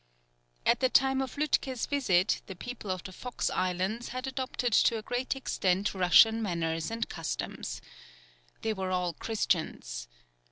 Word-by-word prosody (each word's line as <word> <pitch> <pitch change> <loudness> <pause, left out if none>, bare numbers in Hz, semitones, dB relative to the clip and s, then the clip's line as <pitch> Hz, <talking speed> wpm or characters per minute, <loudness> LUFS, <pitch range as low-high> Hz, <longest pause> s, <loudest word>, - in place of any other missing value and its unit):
At - - +4
the 260 - +3
time 265 +1 +4
of 265 - -4
Lütke's 270 -4 0
visit 200 -10 +2
the 190 - -7
people 240 +1 -7
of 185 -1 -2
the 190 - -7
Fox 250 +6 -3
Islands 185 +6 -1
had 255 +2 -4
adopted 260 -2 -2
to 230 - +5
a 215 - -6
great 250 +4 -1
extent 195 -7 0
Russian 205 +5 +6
manners 165 -5 -1
and 230 0 -2
costumes. - - -4 0.8
They 220 - +1
were 190 -2 -3
all 180 -2 0
Christians. 155 - -2
215 Hz, 150 wpm, -30 LUFS, 180-250 Hz, 0.8 s, Russian